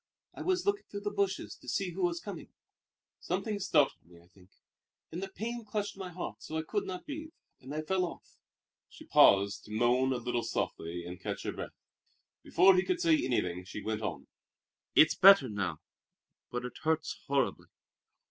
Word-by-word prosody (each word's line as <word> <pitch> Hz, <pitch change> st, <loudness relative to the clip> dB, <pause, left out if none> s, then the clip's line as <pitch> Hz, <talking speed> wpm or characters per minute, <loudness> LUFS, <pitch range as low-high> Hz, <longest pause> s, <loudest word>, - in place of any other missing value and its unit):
"I -, -, -9 dB
was 370 Hz, -1 st, 0 dB
looking 405 Hz, 0 st, 0 dB
through 200 Hz, -, -6 dB
the 205 Hz, 0 st, -2 dB
bushes 200 Hz, -2 st, -1 dB
to 125 Hz, -, -10 dB
see 185 Hz, +8 st, -1 dB
who 185 Hz, +3 st, -5 dB
was 175 Hz, -1 st, +1 dB
coming. 200 Hz, +3 st, -8 dB, 0.7 s
Something 215 Hz, -3 st, -2 dB
startled 150 Hz, -7 st, +2 dB
me, 85 Hz, 0 st, -18 dB
I 85 Hz, +1 st, -22 dB
think; 95 Hz, -1 st, -21 dB, 0.6 s
and 170 Hz, -, -5 dB
the 195 Hz, -, -4 dB
pain 235 Hz, +4 st, -5 dB
clutched 210 Hz, -1 st, -3 dB
at -, -, -15 dB
my 185 Hz, -1 st, -5 dB
heart 175 Hz, 0 st, -6 dB
so 160 Hz, -, -5 dB
I 160 Hz, -, -1 dB
could 205 Hz, +5 st, -2 dB
not 185 Hz, -1 st, -6 dB
breathe, 310 Hz, +2 st, -7 dB, 0.3 s
and 130 Hz, -, -10 dB
I 155 Hz, +1 st, -3 dB
fell 185 Hz, +3 st, +1 dB
off." 170 Hz, -, -10 dB, 0.5 s
She -, -, -14 dB
paused, 100 Hz, +1 st, +5 dB
to -, -, -12 dB
moan 120 Hz, +4 st, +2 dB
a 130 Hz, -, +1 dB
little 120 Hz, 0 st, -1 dB
softly 85 Hz, -5 st, -3 dB
and 90 Hz, 0 st, -8 dB
catch -, -, -4 dB
her -, -, -2 dB
breath. -, -, -7 dB, 0.6 s
Before 185 Hz, +3 st, +5 dB
he 185 Hz, -, +3 dB
could 360 Hz, -2 st, -1 dB
say 335 Hz, -2 st, +4 dB
anything 90 Hz, -7 st, -1 dB
she 95 Hz, +3 st, -8 dB
went 110 Hz, 0 st, -2 dB
on: -, -, -4 dB, 0.7 s
"It's 155 Hz, -, +7 dB
better 195 Hz, -6 st, +8 dB
now, 100 Hz, -7 st, -2 dB, 0.7 s
but 125 Hz, 0 st, -4 dB
it 125 Hz, -, -8 dB
hurts 160 Hz, -1 st, 0 dB
horribly." 140 Hz, -2 st, 0 dB
160 Hz, 190 wpm, -31 LUFS, -, 0.7 s, better